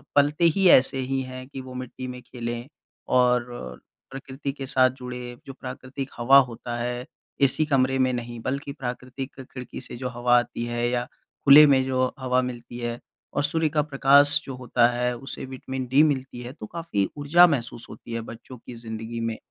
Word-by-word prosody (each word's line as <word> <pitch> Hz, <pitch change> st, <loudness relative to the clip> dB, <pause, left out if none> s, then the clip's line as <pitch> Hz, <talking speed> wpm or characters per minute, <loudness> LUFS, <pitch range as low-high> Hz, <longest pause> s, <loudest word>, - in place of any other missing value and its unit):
पलते 145 Hz, +3 st, +3 dB
ही 195 Hz, -, +4 dB
ऐसे 135 Hz, +1 st, +6 dB
ही 135 Hz, +1 st, -1 dB
है 130 Hz, 0 st, -7 dB
कि 135 Hz, -1 st, -8 dB
वो 130 Hz, 0 st, -10 dB
मिट्टी 130 Hz, 0 st, -7 dB
में 125 Hz, 0 st, -7 dB
खेलें 120 Hz, -1 st, -6 dB, 0.4 s
और 125 Hz, -, +1 dB, 0.3 s
प्रकृति 135 Hz, +1 st, -5 dB
के 135 Hz, -1 st, -6 dB
साथ 130 Hz, -1 st, +4 dB
जुड़े। 125 Hz, -1 st, -7 dB
जो 135 Hz, -, -8 dB
प्राकृतिक 130 Hz, +1 st, -7 dB
हवा 130 Hz, +4 st, +6 dB
होता 120 Hz, +1 st, -6 dB
है, 120 Hz, +1 st, -3 dB, 0.4 s
एसी 140 Hz, +3 st, +4 dB
कमरे 135 Hz, -2 st, +2 dB
में 130 Hz, 0 st, +3 dB
नहीं, 120 Hz, -1 st, -5 dB
बल्कि 140 Hz, +3 st, -3 dB
प्राकृतिक 130 Hz, 0 st, -6 dB
खिड़की 130 Hz, -1 st, -9 dB
से -, -, -8 dB
जो 125 Hz, 0 st, -4 dB
हवा 120 Hz, 0 st, +3 dB
आती 120 Hz, -1 st, -4 dB
है 120 Hz, 0 st, -1 dB
या 120 Hz, 0 st, 0 dB, 0.4 s
खुले 145 Hz, +2 st, +10 dB
में 135 Hz, -2 st, +4 dB
जो 130 Hz, -1 st, +1 dB
हवा 130 Hz, 0 st, +1 dB
मिलती 120 Hz, -1 st, -6 dB
है, 120 Hz, 0 st, -3 dB, 0.3 s
और 145 Hz, -, 0 dB
सूर्य 160 Hz, +1 st, +1 dB
का 150 Hz, 0 st, +1 dB
प्रकाश 145 Hz, 0 st, +5 dB
जो 135 Hz, -, -6 dB
होता 125 Hz, -1 st, +2 dB
है, 125 Hz, 0 st, -1 dB
उसे 135 Hz, +1 st, -7 dB
विटामिन 130 Hz, 0 st, -6 dB
डी 140 Hz, +3 st, +6 dB
मिलती 130 Hz, -2 st, -5 dB
है, 125 Hz, +1 st, -8 dB
तो 125 Hz, -, -9 dB
काफ़ी 135 Hz, -, -2 dB
ऊर्जा 170 Hz, +5 st, +6 dB
महसूस 120 Hz, -6 st, -3 dB
होती 115 Hz, -, -10 dB
है 115 Hz, -, -2 dB
बच्चों 120 Hz, +2 st, -10 dB
की 120 Hz, -, -11 dB
ज़िंदगी 115 Hz, 0 st, -6 dB
में, 115 Hz, -1 st, -2 dB
130 Hz, 190 wpm, -25 LUFS, 120-135 Hz, 0.4 s, खुले